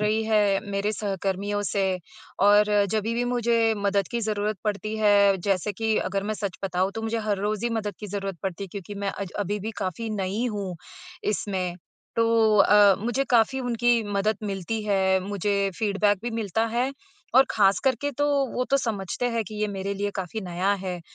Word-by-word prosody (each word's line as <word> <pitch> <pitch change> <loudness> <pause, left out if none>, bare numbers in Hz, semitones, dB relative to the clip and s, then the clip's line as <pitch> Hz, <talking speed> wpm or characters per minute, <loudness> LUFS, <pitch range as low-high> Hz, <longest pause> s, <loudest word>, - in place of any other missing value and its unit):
रही 215 +1 +1
है 210 -3 +3
मेरे 200 +2 0
सहकर्मियों 200 0 -2
से 200 0 0 0.6
और 205 +2 +6 0.3
जभी 220 +1 0
भी 245 +1 0
मुझे 235 -2 +2
मदद 200 -2 0
की 235 - -1
ज़रूरत 210 -1 -1
पड़ती 215 +1 -2
है, 205 -2 +5
जैसे 195 +2 -1
कि 220 +2 0
अगर 195 +1 -1
मैं 215 +2 -2
सच 200 -3 -4
बताऊँ, 185 0 0
तो 225 - -4
मुझे 225 +1 -1
हर 210 -2 -1
रोज़ 210 +2 -2
ही 240 - +1
मदद 215 -3 -2
की 210 - -5
ज़रूरत 195 -2 -4
पड़ती 195 +1 -3
है 195 - -10
क्योंकि 200 0 -7
मैं 200 0 -2
अज 195 -3 -6
अभी 205 +1 -1
भी 220 +3 -4
काफ़ी 200 +4 -3
नई 200 +2 -2
हूँ, 195 -3 -4 0.5
इसमें। 190 -4 -2 0.4
तो 230 -2 +4
अ, 205 0 +7
मुझे 240 +4 0
काफ़ी 240 +3 +3
उनकी 240 -1 +2
मदद 200 +1 +1
मिलती 200 +2 -3
है, 190 -2 +2
मुझे 200 +1 -1
फ़ीडबैक 205 -1 +2
भी 240 - -3
मिलता 225 -1 -1
है 245 +4 -1 0.4
और 265 +1 +8
खासकर 205 +6 +3
के 285 - -1
तो, 290 +1 -1 0.3
वो 250 - 0
तो 275 - +5
समझते 220 -3 -2
हैं 230 -1 0
कि 215 - -9
ये 215 - +2
मेरे 200 0 -3
लिए 205 +1 -2
काफ़ी 190 +3 -4
नया 185 +1 0
है, 180 -2 -3
205 Hz, 190 wpm, -25 LUFS, 195-225 Hz, 0.6 s, और